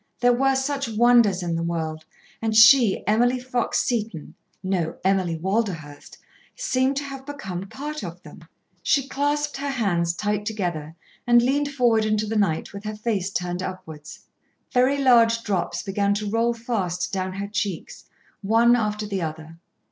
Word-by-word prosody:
There 245 0 +4
were 270 +2 +2
such 275 -1 -1
wonders 225 -4 +4
in 170 -1 -2
the 165 - -2
world, 160 -2 -3 0.4
and 220 -1 -1
she, 225 -1 +6
Emily 240 +4 +2
Fox 250 -1 -1
Seton, 215 - -3 0.3
no, 185 -4 -1
Emily 185 -3 +1
Walderhurst, 175 -6 -3 0.4
seemed 265 - 0
to 285 - -1
have 275 -1 -8
become 195 -10 -6
part 300 +2 -6
of - - -8
them. - - -13 0.4
She 275 -2 +1
clasped 290 +1 -1
her 280 +1 -3
hands 175 -10 0
tight 210 +2 -1
together 170 -7 -3 0.3
and 240 0 +6
leaned 285 +3 +1
forward 240 -5 +2
into 215 0 0
the 220 +1 -3
night 195 -6 0
with 200 0 -8
her 215 0 -5
face 210 -4 -2
turned 180 -1 -3
upwards. 170 -5 -8 0.5
Very 255 +3 +3
large 230 -4 +4
drops 190 -6 -2
began 200 +1 0
to 210 0 -3
roll 230 +3 +1
fast 200 -7 -3
down 185 -1 -2
her 200 +1 -4
cheeks, 200 -3 -4 0.4
one 230 +4 +4
after 210 -2 -1
the 200 -2 -3
other. 160 0 -6
215 Hz, 160 wpm, -23 LUFS, 185-245 Hz, 0.5 s, she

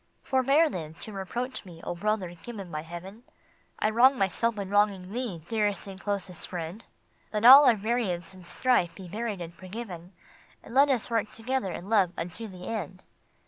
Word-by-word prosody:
" - - -42
Forbear, 275 +5 +4
then, 160 - -6
to 215 - -8
reproach 240 +7 -4
me, 175 -4 -12
O - - -3
brother 195 -1 -1
given 195 +1 -9
by 155 - -3
Heaven! 175 +7 -9 0.6
I 215 - +1
wrong 255 +4 +5
myself 215 +3 +1
in 200 -1 -4
wronging 200 -2 +2
thee, 225 -10 -4
dearest 210 -3 0
and 195 -1 -9
closest 195 -4 -2
friend! 175 +4 -6 0.5
Let 215 +1 -1
all 275 +4 +11
our 240 - +6
variance 205 -5 -2
and 185 -1 -13
strife 175 -2 +1
be 190 -2 -9
buried 210 0 -4
and 170 0 -7
forgiven, 185 -1 -8 0.5
And - - -11
let 280 +2 +6
us 250 -3 0
work 225 -2 0
together 230 -3 -2
in 180 - -7
love 200 -5 +3
unto 180 +7 -5
the 185 -2 -10
end." 185 -4 -5
200 Hz, 185 wpm, -28 LUFS, 180-230 Hz, 0.6 s, all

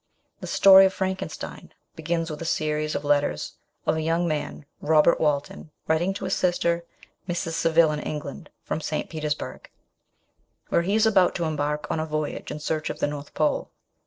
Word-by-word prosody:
The - - -7
story 195 0 +8
of 190 - -5
Frankenstein 190 0 -5 0.2
begins 165 0 -2
with 150 - -7
a 165 - 0
series 155 0 -1
of - - -2
letters 145 - 0 0.3
of - - +2
a 160 - -1
young 165 +2 +1
man, 150 -1 -3
Robert 155 +2 +4
Walton, 150 +1 -1 0.2
writing 165 +4 +2
to - - -6
his - - 0
sister, 170 -1 +1 0.5
Mrs. 170 -1 -2
Saville 165 -1 +3
in 150 - -2
England, 150 -2 -6
from 160 - -3
St. 155 - -3
Petersburg, 155 -2 -4 1.0
where - - +3
he 195 +5 0
is 220 0 +4
about 195 -5 +4
to 175 - -1
embark 150 -1 -1
on - - -1
a 160 - -2
voyage 155 -1 -3
in 150 - -5
search 155 0 -2
of - - -4
the - - 0
North 145 0 -6
Pole. 155 - 0
160 Hz, 180 wpm, -25 LUFS, 150-170 Hz, 1.0 s, story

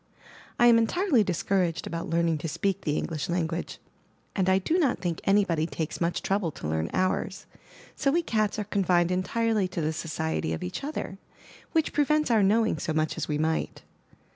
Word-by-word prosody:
I 240 - +5
am 235 -1 +7
entirely 265 - +2
discouraged 180 -2 0
about 165 -1 -4
learn 170 +1 +2
ing 160 -2 0
to 165 - -4
speak 185 +5 -1
the 150 0 -1
English 155 -2 -3
language, 170 -1 -2 0.6
and 190 -2 +2
I 190 - +5
do 320 - +1
not 280 -8 +2
think 170 -3 -3
anybody 185 -6 +2
takes 160 -1 -4
much 170 0 0
trouble 195 -3 0
to - - -6
learn 80 +1 -1
ours; 185 +1 -1 0.5
so 275 - +1
we 335 +5 +2
cats 215 -8 0
are 210 - -1
confined 180 -4 +2
entirely 215 +2 +1
to 180 - -5
the 155 0 0
society 80 - -2
of 80 - -4
each 90 - -5
other, 275 -9 -5 0.5
which 320 -2 +1
prevents 300 -1 +2
our 220 -2 +4
knowing 215 -3 +2
so 160 - -2
much 155 0 0
as - - -3
we 150 - -1
might. 160 +1 -1
185 Hz, 190 wpm, -27 LUFS, 160-220 Hz, 0.6 s, am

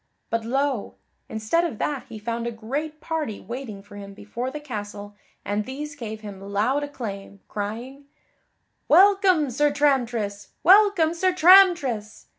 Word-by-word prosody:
But 230 -1 0
lo! 270 -1 -1 0.3
instead 220 +11 0
of 325 -10 -3
that 285 +2 -2
he 220 - -8
found 230 +2 -3
a - - -2
great 285 +8 -5
party 310 -10 -3
waiting 235 -5 -7
for 205 0 -13
him 200 -1 -9
before 230 +5 -5
the 300 +3 -6
castle 205 -6 -7 0.3
and 205 +1 -1
these 290 +5 -7
gave 220 -5 -7
him 200 -3 -9
loud 210 +8 0
acclaim, 200 -8 -7
crying, 235 +7 -6 0.8
"Welcome, 370 -4 +5
Sir 290 +4 +2
Tramtris! 240 -8 0 0.2
Welcome, 385 -3 +5
Sir 370 +2 +1
Tramtris!" 345 - +5
250 Hz, 140 wpm, -24 LUFS, 210-300 Hz, 0.8 s, Welcome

